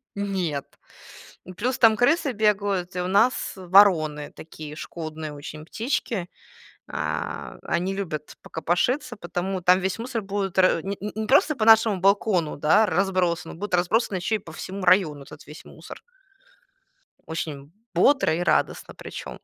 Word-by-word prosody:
Нет. 185 -8 -2 0.8
И - - -7
плюс 245 +8 -2
там 225 -2 +6
крысы 275 +5 +2
бегают, 200 -4 0
и - - -1
у 180 - -3
нас 215 +7 +2
вороны 175 -6 +4
такие 155 -1 -10
шкодные 155 -1 -7
очень 150 +1 -9
птички. 225 - -2 0.6
А, - - -4
они 180 +3 -1
любят 160 -7 -5
покопошиться, 240 - -1
поэтому 180 0 -4
там 180 +1 +5
весь 190 +1 -2
мусор 230 -1 -4
будет 195 -1 -3
ра 185 -3 +4
не 200 +1 -3
не 210 +1 -5
не 220 0 -2
просто 280 +5 +4
по 220 - 0
нашему 220 -2 +6
балкону, 195 -4 +2
да, 160 +10 +4
разбросан, 185 -4 0
он - - -12
будет 205 0 -4
разбросан 190 +4 +1
еще 180 +5 -1
и - - -4
по 175 -5 -12
всему 190 +4 -7
району, 175 -5 +3
этот 140 - -13
весь 150 - -11
мусор. - - -12 1.3
Очень 150 -3 -5 0.2
бодро 265 - +3
и 170 - -2
радостно - - 0
причем. - - -9
190 Hz, 150 wpm, -24 LUFS, 165-210 Hz, 1.3 s, там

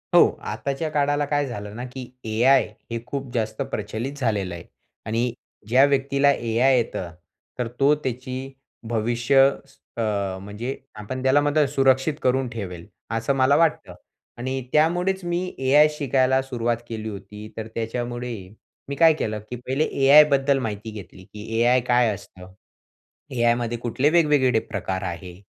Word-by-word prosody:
हो. - - +8 0.2
आताच्या 140 +3 -3
काळाला 145 0 +1
काय 145 0 0
झालं 105 -4 -7
ना, 120 - -5
की 125 0 -8 0.2
एआय 130 +4 +5 0.3
हे 115 - -2
खूप 135 -1 -5
जास्त 110 +3 -2
प्रचलित 110 +6 -4
झालेलं 105 -8 -1
आहे 85 - -9 0.4
आणि 115 +2 0 0.4
ज्या 130 +4 +5
व्यक्तीला 140 0 +2
एआय 120 +3 +2
येतं, 95 -7 -2 0.5
तर 120 - 0
तो 140 +2 +5
त्याची 130 -1 -5 0.4
भविष्य 120 +4 +2 0.6
अ, 115 - -1 0.4
म्हणजे 105 +6 -5 0.2
आपण 130 +5 -6
त्याला 135 +2 +4
मात्र 145 0 +2
सुरक्षित 135 +1 +2
करून 130 +1 +1
ठेवेल, 90 -7 -7 0.3
असं 115 +4 0
मला 135 +2 +4
वाटतं 165 0 +1 0.4
आणि 130 +2 -3
त्यामुळेच 175 +5 +2
मी 175 +1 -1 0.2
एआय 145 +3 +5
शिकायला 130 -2 +2
सुरुवात 120 -3 -1
केली 110 -1 -4
होती 105 +1 -9
तर 110 0 -4
त्याच्यामुळे, 120 +1 -3 0.6
मी 140 - -3
काय 165 0 +6
केलं, 110 -7 -3
की 125 - -4
पहिले 135 +4 +1 0.2
एआय 145 +3 +9
बद्दल 135 0 +2
माहिती 110 -2 -4
घेतली, 95 -3 -11
की 105 +3 -11
एआय 125 +1 +4
काय 120 -2 +4
असतं? 95 -1 -12 0.8
एआयमध्ये 120 0 +1
कुठले 125 +5 +1
वेगवेगळे 145 -8 +3
प्रकार 95 -2 -4
आहे? 90 -1 -6
125 Hz, 145 wpm, -23 LUFS, 110-140 Hz, 0.8 s, एआय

